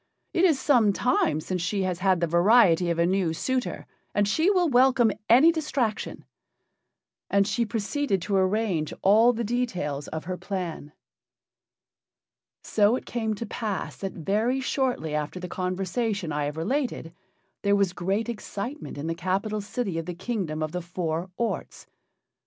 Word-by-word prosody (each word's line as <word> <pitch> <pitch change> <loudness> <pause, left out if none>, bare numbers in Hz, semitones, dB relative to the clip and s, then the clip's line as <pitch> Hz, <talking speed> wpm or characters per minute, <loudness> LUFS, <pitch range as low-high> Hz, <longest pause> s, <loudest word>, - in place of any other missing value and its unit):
It 350 - +4
is 315 -7 +3
some 240 -7 +4
time 175 -10 +1
since 180 +2 -3
she 195 +3 -1
has 180 -2 -2
had 185 -2 +2
the - - +3
variety 175 0 +4
of 170 - 0
a 170 - +3
new 180 -2 +1
suitor, 255 +8 -2 0.3
and 205 0 +3
she 320 - +2
will 365 -4 +3
welcome 250 -4 +4 0.2
any 265 +9 +7
distraction." 280 -9 -2 1.0
And 200 0 +3
she 225 +2 0
proceeded 220 +1 -1
to 205 - -1
arrange 190 -4 +1
all 220 +5 +6
the 235 0 -3
details 190 - -2
of 160 0 -5
her 185 +1 -3
plan. 175 -7 -5 1.7
So 210 +2 +3
it - - -5
came 220 -2 -2
to 230 - -5
pass 210 -2 -4
that 195 -1 -4
very 215 - 0
shortly 255 - -1
after 150 +4 -3
the 180 - -5
conversation 185 +1 -2
I 145 0 -1
have 145 +2 -4
related 235 - -2 0.5
there 200 0 +3
was 200 -3 +1
great 195 +6 -1
excitement 235 - -6
in 145 - -5
the 165 - -1
capital 195 +5 -1
city 200 -4 -3
of 165 - -6
the 180 - -4
Kingdom 180 -6 -3
of 155 - -3
the 180 - -3
Four 170 0 -3
Orts. 235 -1 -3
200 Hz, 160 wpm, -26 LUFS, 175-235 Hz, 1.7 s, any